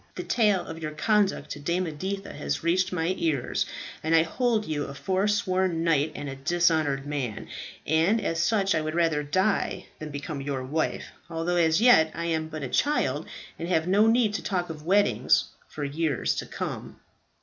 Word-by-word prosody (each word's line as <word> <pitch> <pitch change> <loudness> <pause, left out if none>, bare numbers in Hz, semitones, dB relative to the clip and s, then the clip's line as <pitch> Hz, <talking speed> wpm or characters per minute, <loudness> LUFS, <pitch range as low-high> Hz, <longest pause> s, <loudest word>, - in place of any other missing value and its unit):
The - - -4
tale 210 -6 +2
of 165 0 -8
your 155 -1 -4
conduct 205 +5 +1
to 145 - -5
Dame 170 +5 0
Editha 190 +5 -4
has 70 0 -3
reached 180 +3 +2
my 175 0 0
ears, 150 -7 0 0.3
and 160 +1 +2
I 160 - +6
hold 220 +5 0
you 150 -2 -2
a 140 - -8
foresworn 185 -1 0
knight 155 -2 +2
and 145 - -5
a 135 - -5
dishonoured 155 -2 +1
man, 140 -7 -4 0.4
and 165 +9 +3
as 170 -5 -1
such 195 0 +2
I 160 - +1
would 155 +1 -3
rather 165 -3 +2
die 185 +8 0
than 155 - -6
become 145 0 -5
your 135 -2 -3
wife, 155 +5 -2 0.2
although 170 +2 -1
as 160 +1 +3
yet 195 -10 +6
I 170 - -3
am 160 -2 -1
but 155 -2 -6
a - - -2
child, 150 - 0 0.3
and 165 - -3
have 160 -2 +1
no 205 +4 +4
need 225 -2 +3
to - - -2
talk 180 -4 -1
of 155 0 -10
weddings 200 +2 +3 0.2
for 150 - -6
years 145 -1 0
to - - -4
come." - - -6
165 Hz, 185 wpm, -27 LUFS, 150-190 Hz, 0.4 s, I